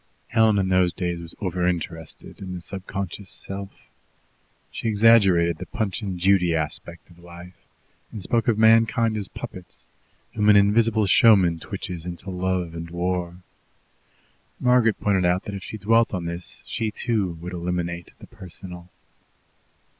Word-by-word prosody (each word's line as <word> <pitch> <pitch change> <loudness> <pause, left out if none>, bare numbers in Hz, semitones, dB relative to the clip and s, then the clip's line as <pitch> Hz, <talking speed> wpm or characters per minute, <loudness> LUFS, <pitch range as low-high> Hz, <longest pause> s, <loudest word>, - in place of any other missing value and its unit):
Helen 110 -2 +4
in 95 -1 +1
those 90 -1 +3
days 85 0 -3
was 85 -1 -10
over 90 -2 -1
interested 80 -2 -4
in 95 -2 -6
the 90 - -7
subconscious 95 +1 -6
self. 100 0 -6 0.9
She - - -4
exaggerated 100 -7 +4
the 95 - -7
Punch 110 -4 -2
and 95 -4 -4
Judy 90 -2 +3
aspect 80 +3 -5
of 85 - -19
life, 85 +1 -13 0.4
and 110 - -7
spoke 115 +4 0
of 115 -3 +2
mankind 115 0 +4
as 105 -2 -3
puppets, 90 -1 -10 0.5
whom 105 -1 +2
an 105 - +7
invisible 110 +2 +4
showman 95 -5 +5
twitches 90 -2 -6
into 90 +2 -7
love 90 -2 -2
and 85 0 -7
war. 90 0 -3 1.2
Margaret 125 -3 +3
pointed 95 -3 +1
out 90 +2 +2
that 105 - -7
if 100 - -5
she 110 - -7
dwelt 115 +2 +2
on 90 -2 -4
this 85 -3 -5
she, 110 - -2
too, 105 -4 -1
would 90 +2 -7
eliminate 85 -1 -3
the - - -13
personal. 90 -4 -11
95 Hz, 150 wpm, -24 LUFS, 85-105 Hz, 1.2 s, an